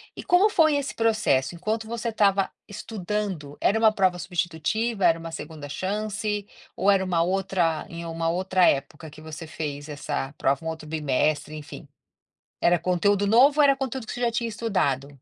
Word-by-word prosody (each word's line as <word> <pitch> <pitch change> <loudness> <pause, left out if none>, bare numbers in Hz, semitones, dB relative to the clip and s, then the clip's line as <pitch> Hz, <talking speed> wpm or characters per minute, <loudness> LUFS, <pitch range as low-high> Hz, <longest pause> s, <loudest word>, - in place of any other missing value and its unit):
E - - -7
como 380 +3 +4
foi 315 -5 +4
esse 285 0 -2
processo? 215 -12 +1
Enquanto 220 +5 -3
você 235 0 -3
estava 200 -3 +2 0.2
estudando, 200 -7 -4
era 210 - +3
uma 220 -1 +5
prova 190 -4 +2
substitutiva? 180 +5 -1
Era 165 - +4
uma 165 0 -7
2ª 155 -2 -8
chance? 210 +3 -3 0.3
Ou 190 +3 +1
era 195 -1 +4
uma 175 -3 +1
outra 175 -3 0
em 170 0 -7
uma 165 0 -2
outra 185 0 +2
época 150 +3 -1
que 155 - -13
você 160 +1 -8
fez 145 -1 -6
essa 140 -2 -4
prova? 140 +5 0
Um 160 - -1
outro 160 -1 -7
bimestre, 150 0 0
enfim. 150 -1 -9 0.7
Era 175 0 +4
conteúdo 200 +3 +1
novo? 270 +8 +5
Ou - - +7
era 275 -1 +6
conteúdo 265 -3 -4
que - - -5
você 245 - -6
já 240 - +2
tinha 230 0 -2
estudado? 190 - -1
185 Hz, 175 wpm, -25 LUFS, 160-220 Hz, 0.7 s, Ou